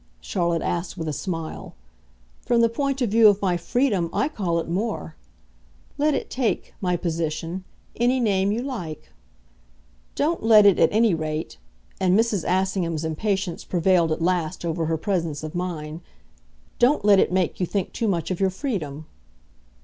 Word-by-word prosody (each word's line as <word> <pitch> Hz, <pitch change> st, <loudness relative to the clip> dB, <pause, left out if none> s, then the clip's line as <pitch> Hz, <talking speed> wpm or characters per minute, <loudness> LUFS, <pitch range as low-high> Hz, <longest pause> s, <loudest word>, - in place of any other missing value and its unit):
Charlotte 170 Hz, -, -1 dB
asked 175 Hz, +2 st, -3 dB
with 165 Hz, -2 st, -4 dB
a 155 Hz, -, -2 dB
smile. 165 Hz, 0 st, -5 dB, 0.7 s
"From 235 Hz, -1 st, +2 dB
the 230 Hz, -, +4 dB
point 275 Hz, +2 st, -1 dB
of 225 Hz, -, -1 dB
view 225 Hz, 0 st, +7 dB
of 205 Hz, -1 st, +4 dB
my 185 Hz, -3 st, +1 dB
freedom 195 Hz, -1 st, 0 dB
I 285 Hz, -, 0 dB
call 180 Hz, -, -1 dB
it 165 Hz, -, -2 dB
more. 190 Hz, -2 st, -3 dB, 0.8 s
Let 300 Hz, 0 st, +3 dB
it -, -, -4 dB
take, 250 Hz, -4 st, -1 dB
my 180 Hz, -2 st, +1 dB
position, 165 Hz, +1 st, -3 dB, 0.3 s
any 245 Hz, +2 st, +2 dB
name 200 Hz, -4 st, +2 dB
you 230 Hz, +4 st, -1 dB
like." 180 Hz, -, -6 dB, 1.0 s
"Don't 320 Hz, +4 st, 0 dB
let 215 Hz, -2 st, +6 dB
it, 200 Hz, -3 st, +5 dB
at 165 Hz, -, +4 dB
any 220 Hz, -1 st, +3 dB
rate" 155 Hz, -, -4 dB, 0.4 s
and 185 Hz, 0 st, +3 dB
Mrs. 225 Hz, -5 st, +1 dB
Assingham's 180 Hz, -4 st, 0 dB
impatience 185 Hz, +2 st, -2 dB
prevailed 175 Hz, -2 st, +2 dB
at 160 Hz, +1 st, -1 dB
last 175 Hz, -1 st, -1 dB
over 165 Hz, -1 st, -1 dB
her 160 Hz, 0 st, 0 dB
presence 165 Hz, -5 st, -2 dB
of 155 Hz, -, -6 dB
mind 165 Hz, -3 st, -4 dB, 0.8 s
"don't 245 Hz, -3 st, +3 dB
let 200 Hz, -2 st, +6 dB
it -, -, +2 dB
make 185 Hz, -2 st, 0 dB
you 180 Hz, -, 0 dB
think 195 Hz, 0 st, -2 dB
too 230 Hz, -, -1 dB
much 175 Hz, -3 st, -1 dB
of 185 Hz, -, -2 dB
your 195 Hz, -1 st, +3 dB
freedom." 180 Hz, -, -4 dB
185 Hz, 165 wpm, -24 LUFS, 165-215 Hz, 1.0 s, view